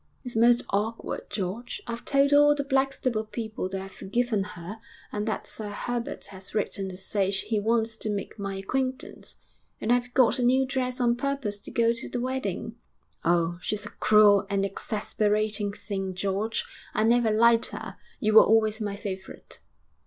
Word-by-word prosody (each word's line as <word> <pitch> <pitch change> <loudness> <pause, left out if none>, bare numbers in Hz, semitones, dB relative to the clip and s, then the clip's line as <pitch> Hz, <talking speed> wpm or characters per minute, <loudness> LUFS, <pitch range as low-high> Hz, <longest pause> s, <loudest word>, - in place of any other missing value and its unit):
'It's 250 -3 -6
most 240 +2 +5
awkward, 215 +3 -2
George. 210 +5 -4
I've 235 0 -5
told 280 0 +3
all 290 0 +7
the 285 - -1
Blackstable 265 -4 0
people 215 -3 -4
that 195 0 -3
I've 195 0 -8
forgiven 220 +2 -1
her 195 +3 -8 0.3
and 210 +1 -3
that 220 - -2
Sir 215 -2 -6
Herbert 240 +3 -4
has 190 +2 -7
written 195 -2 -1
to 185 - -8
say 195 0 0
he 205 +2 -1
wants 225 +1 +1
to 215 - -3
make 205 +1 -4
my 200 -1 -3
acquaintance. 255 +7 -3 0.4
And 230 - +2
I've 245 0 0
got 255 -1 +4
a - - +1
new 260 +2 +4
dress 255 -1 -2
on 240 -1 +2
purpose 265 -6 -2
to - - -11
go 230 0 +3
to 235 - -7
the 245 - -3
wedding. 240 -3 -3 0.5
Oh! 170 0 +2
she's 210 -1 -2
a - - -7
cruel 210 -2 +5
and 200 -1 +1
exasperating 210 +1 -1
thing, 195 -2 -4
George; 200 +4 -1 0.3
I 215 - +3
never 235 0 +4
liked 230 +1 +4
her. - - -7 0.2
You 215 0 +1
were 220 - +10
always 220 0 +3
my 205 -1 -2
favourite.' 190 -2 -6
220 Hz, 175 wpm, -27 LUFS, 200-240 Hz, 0.5 s, were